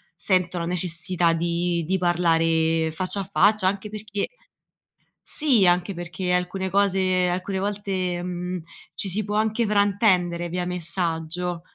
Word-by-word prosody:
sento 180 0 +1
la 170 - -3
necessità 175 0 +1
di 170 +1 -1
di 190 +4 0
parlare 165 -2 +2
faccia 185 +4 -2
a 190 - -8
faccia, 205 0 +3
anche 200 +2 -2
perché 210 -1 -4 0.9
sì, 265 -10 +3
anche 180 +2 +2
perché 175 +1 -4
alcune 180 +1 -1
cose 185 -2 +2
alcune 185 +2 -2
volte, 190 -3 -2
mhmm, 180 0 -4 0.3
ci 195 - 0
si 205 +4 +1
può 210 +1 -4
anche 220 +2 +1
fraintendere 195 -4 +2
via 180 +1 -2
messaggio. 175 -1 -2
180 Hz, 135 wpm, -24 LUFS, 175-195 Hz, 0.9 s, faccia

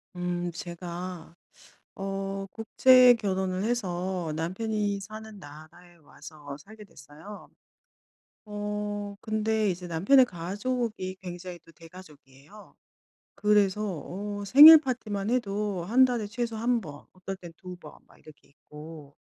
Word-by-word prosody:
음, 175 0 -3
제가 175 0 -8 0.6
어 195 0 -4
국제 250 +3 +5
결혼을 190 -3 -2
해서 185 -6 -2
남편이 205 +4 -2
사는 215 +1 -10
나라에 170 +3 -15
와서 145 -2 -12
살게 210 +7 -14
됐어요. 160 +5 -13 1.0
어 205 -1 -5
근데 215 -1 0
이제 180 0 -7
남편의 195 +11 +4
가족이 200 +1 -4
굉장히 175 -1 -8
또 - - -17
대가족이에요. 160 +1 -16 0.6
그래서 210 -1 +2 0.2
어 205 +2 -6
생일 300 +8 +11
파티만 215 -7 -3
해도 205 -6 -2
1 240 +8 +5
달에 240 -4 -1
최소 230 0 -4
1 235 +2 0
번, 150 -7 -11
어떨 185 +1 -7
땐 175 -3 -12
2 180 0 -9
번, 155 -4 -13
막 - - -22
이렇게 150 -2 -18
있고 150 0 -13
195 Hz, 225 characters per minute, -27 LUFS, 175-215 Hz, 1.0 s, 생일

